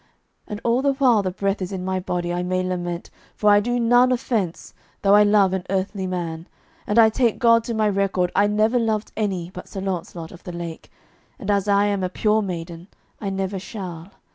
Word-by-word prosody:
And 210 Hz, -1 st, -5 dB
all 235 Hz, +2 st, +2 dB
the 280 Hz, 0 st, +2 dB
while 255 Hz, -6 st, +4 dB
the 190 Hz, -, -1 dB
breath 195 Hz, +2 st, -2 dB
is 185 Hz, -, -3 dB
in 185 Hz, -2 st, -4 dB
my 190 Hz, 0 st, -1 dB
body 175 Hz, -1 st, -2 dB
I 175 Hz, -, -1 dB
may 185 Hz, +1 st, -1 dB
lament, 175 Hz, -1 st, -4 dB, 0.2 s
for 210 Hz, -1 st, +3 dB
I 205 Hz, -, +6 dB
do 245 Hz, +3 st, -1 dB
none 245 Hz, +2 st, +4 dB
offence, 230 Hz, -8 st, -2 dB, 0.3 s
though 200 Hz, 0 st, +5 dB
I 210 Hz, -, +7 dB
love 205 Hz, -2 st, +4 dB
an 190 Hz, -1 st, -2 dB
earthly 190 Hz, 0 st, -2 dB
man, 170 Hz, -2 st, -4 dB, 0.4 s
and 210 Hz, -, 0 dB
I 225 Hz, -1 st, +8 dB
take 235 Hz, 0 st, +1 dB
God 230 Hz, -2 st, +4 dB
to 235 Hz, -, -3 dB
my 215 Hz, -1 st, +2 dB
record 195 Hz, -3 st, 0 dB
I 205 Hz, -, +4 dB
never 215 Hz, +4 st, +2 dB
loved 220 Hz, -2 st, -1 dB
any 190 Hz, -5 st, -2 dB
but 180 Hz, -, -9 dB
Sir 195 Hz, -, -7 dB
Launcelot 175 Hz, -3 st, -4 dB
of 175 Hz, -, -13 dB
the 180 Hz, -, -7 dB
Lake, 170 Hz, -1 st, -7 dB, 0.5 s
and 205 Hz, -, -2 dB
as 200 Hz, 0 st, +1 dB
I 200 Hz, 0 st, +4 dB
am 200 Hz, -2 st, 0 dB
a 185 Hz, -, 0 dB
pure 215 Hz, +3 st, +1 dB
maiden 170 Hz, -2 st, -6 dB, 0.3 s
I 200 Hz, -, -3 dB
never 195 Hz, 0 st, -2 dB
shall. 185 Hz, -3 st, -7 dB
195 Hz, 215 wpm, -22 LUFS, 180-215 Hz, 0.5 s, I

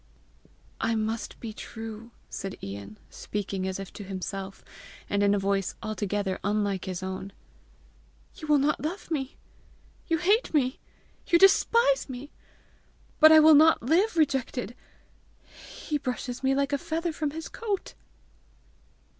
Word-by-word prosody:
"I 225 Hz, 0 st, 0 dB
must 220 Hz, +1 st, -3 dB
be 225 Hz, -2 st, -6 dB
true!" 225 Hz, +1 st, -8 dB, 0.2 s
said 195 Hz, -1 st, -6 dB
Ian, 100 Hz, +1 st, -7 dB
speaking 195 Hz, -2 st, -4 dB
as 190 Hz, 0 st, -3 dB
if 195 Hz, -, -8 dB
to 205 Hz, -, -8 dB
himself, 195 Hz, 0 st, -6 dB, 0.4 s
and 200 Hz, -, 0 dB
in 205 Hz, 0 st, +4 dB
a -, -, +1 dB
voice 195 Hz, -1 st, 0 dB
altogether 205 Hz, -3 st, -2 dB
unlike 200 Hz, -2 st, 0 dB
his 185 Hz, -1 st, -4 dB
own. 190 Hz, +1 st, -5 dB, 1.0 s
"You 310 Hz, -, -9 dB
will 300 Hz, -1 st, +5 dB
not 285 Hz, +2 st, +1 dB
love 340 Hz, +5 st, -5 dB
me! 270 Hz, -4 st, -3 dB, 0.7 s
You 330 Hz, -, +2 dB
hate 395 Hz, +2 st, +2 dB
me! 260 Hz, -3 st, +1 dB, 0.5 s
You 340 Hz, -, +5 dB
despise 385 Hz, -, +4 dB
me! 260 Hz, +3 st, -7 dB, 0.9 s
But 310 Hz, 0 st, +9 dB
I 315 Hz, -, +9 dB
will 310 Hz, 0 st, +8 dB
not 315 Hz, -1 st, +6 dB
live 345 Hz, -, +2 dB
rejected! 260 Hz, -6 st, 0 dB, 0.8 s
He 300 Hz, -1 st, -5 dB
brushes 250 Hz, -2 st, -4 dB
me 270 Hz, 0 st, +2 dB
like 280 Hz, +1 st, 0 dB
a 285 Hz, -, +1 dB
feather 330 Hz, +3 st, -2 dB
from 305 Hz, -1 st, -2 dB
his 320 Hz, +2 st, -6 dB
coat!" 425 Hz, -5 st, -4 dB
245 Hz, 140 wpm, -27 LUFS, 200-310 Hz, 1.0 s, But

